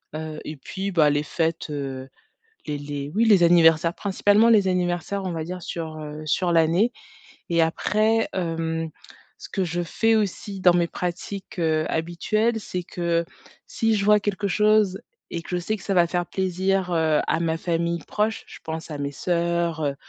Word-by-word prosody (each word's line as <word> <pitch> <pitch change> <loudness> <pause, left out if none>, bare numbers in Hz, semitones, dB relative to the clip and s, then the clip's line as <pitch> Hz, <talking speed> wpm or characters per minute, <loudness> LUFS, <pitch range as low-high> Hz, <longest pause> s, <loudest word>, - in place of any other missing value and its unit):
heu 155 0 -5
et 155 - -5
puis, 190 +7 -5
bah, 155 -5 +4
les 145 0 +1
fêtes, 165 +1 -2
heu, 135 -2 -5 0.6
les 150 -2 -3
les 145 0 -5
oui 225 +3 +3
les 205 -5 +5
anniversaires, 165 0 +5
principalement 205 +2 +3
les 215 -4 +5
anniversaires, 180 +2 -1
on 185 - -2
va 160 -1 -3
dire 180 +1 -6
sur, 160 -2 -5
heu 150 0 -7
sur 175 +3 +1
l'année 170 +8 +3 0.6
et 170 -1 +3
après, 215 +7 +1
hem, 165 -2 -2 0.5
ce - - -10
que 195 - -1
je 175 0 -2
fais 225 +7 +1
aussi 205 -2 -2
dans 180 -1 +5
mes 175 -1 +3
pratiques, 180 +3 -5
heu, 155 -2 +1
habituelles, 215 +8 0
c'est 180 -3 -4
que 170 -1 -1 0.4
si 225 -1 0
je 200 - -1
vois 210 0 +5
quelque 205 0 -2
chose 210 -1 +3 0.3
et 170 - -4
que - - -15
je 180 - 0
sais 205 +5 -2
que - - -14
ça 195 - -1
va 175 -2 +5
faire 175 0 -1
plaisir, 190 0 0
heu, 160 -2 +2
à 160 - 0
ma 165 -1 0
famille 170 0 -1
proche- 215 +1 -1
je - - -12
pense 160 +1 -6
à 150 - -5
mes 140 0 -3
soeurs, 170 0 -1
heu, 140 - 0
175 Hz, 185 wpm, -24 LUFS, 160-195 Hz, 0.6 s, les